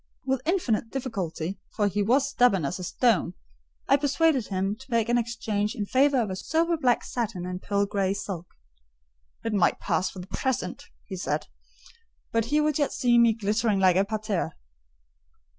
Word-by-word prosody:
With 265 -1 0
infinite 250 - +1
difficulty, 195 -9 -4 0.2
for 205 -2 +2
he 205 +1 -1
was 260 +7 +3
stubborn 245 - +3
as 175 +7 -3
a - - -5
stone, 230 +3 +1 0.5
I 275 - +5
persuaded 285 -2 +2
him 195 +1 -1
to 265 +2 -15
make 230 -2 +1
an 240 - +3
exchange 220 -3 -2
in 205 - -2
favour 270 +4 +3
of 210 -4 -2
a - - -3
sober 330 - +1
black 255 -6 +2
satin 215 -7 -3
and 180 0 -5
pearl 200 0 +1
grey 195 -1 0
silk. 185 -4 -5 1.0
"It 225 - -1
might 195 -4 +2
pass 185 - 0
for - - -12
the 180 - -6
present," 200 -1 -3 0.2
he 195 - -6
said; - - -2 0.9
"but 230 -1 +1
he 295 +6 +2
would 300 0 +1
yet 290 - +1
see 240 -1 +3
me 235 -1 +5
glittering 215 -1 0
like 185 -2 +5
a 190 - +4
parterre." 215 -2 -2
220 Hz, 175 wpm, -26 LUFS, 195-260 Hz, 1.0 s, I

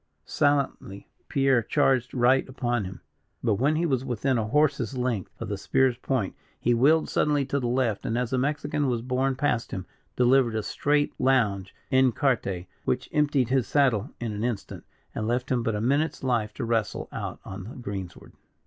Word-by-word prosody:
Silently 140 -9 0 0.2
Pierre 135 -3 +3
charged 130 0 +1
right 130 +2 +3
upon 120 -4 -1
him; 95 +1 -8 0.4
but, 115 -3 +2
when 145 +5 +2
he 165 +2 +1
was 130 -5 0
within 125 0 0
a 110 - -1
horse's 140 -2 +1
length 125 -7 -2
of - - -4
the - - -4
spear's 130 -2 +2
point, 125 -7 -1 0.3
he 120 - +2
wheeled 150 +7 +4
suddenly 145 -2 +1
to 140 +1 -1
the 125 - -2
left, 120 -4 0
and 115 - -1
as 125 -1 -1
the 130 - +1
Mexican 145 +1 -1
was 120 -3 -1
borne 130 +1 0
past 130 -4 0
him, 95 - -5 0.3
delivered 125 -2 +3
a 110 - -1
straight 145 +6 +1
lounge, 105 -8 +1 0.2
en 130 -1 +5
carte, 115 - 0 0.2
which - - -1
emptied 145 -5 +2
his 130 -5 +1
saddle 130 -5 +2
in 115 -2 -3
an 105 +1 -4
instant, 120 -4 -4 0.3
and 110 - -3
left 125 +2 -1
him 125 -2 +2
but 115 -2 -1
a - - -1
minute's 140 +7 0
life 120 -5 0
to - - -3
wrestle 115 -3 -1
out - - -5
on 95 -1 -7
the 115 - -9
greensward. 100 -7 -7
125 Hz, 185 wpm, -26 LUFS, 115-135 Hz, 0.4 s, en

